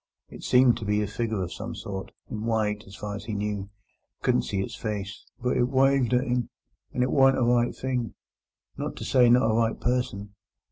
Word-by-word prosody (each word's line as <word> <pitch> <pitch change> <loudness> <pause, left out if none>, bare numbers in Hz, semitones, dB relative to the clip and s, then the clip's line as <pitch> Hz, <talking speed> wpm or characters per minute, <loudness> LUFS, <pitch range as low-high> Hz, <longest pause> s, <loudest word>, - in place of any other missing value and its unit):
It - - -11
seemed 125 -1 +5
to 110 - -6
be 105 +1 +1
a - - -2
figure 110 -1 -2
of 90 - -5
some - - -6
sort, 95 -1 -6 0.2
in 110 -3 -5
white 110 -2 0
as 95 - -11
far 105 +1 -5
as 105 - -7
he 110 -2 -4
knew—couldn't 100 -1 -3
see 100 - -3
its - - -6
face; 105 -3 -5
but 125 0 0
it 120 0 +2
wived 135 -2 +3
at 125 +2 +2
him, 125 -2 -1 0.4
and 125 - 0
it 125 - 0
warn't 135 -1 +5
a 130 - +2
right 120 0 +2
thing—not 125 -6 -6
to - - -6
say 125 -2 +5
not 120 -1 +5
a 110 - +2
right 115 0 +1
person. 110 -5 -2
115 Hz, 200 wpm, -26 LUFS, 105-125 Hz, 0.4 s, seemed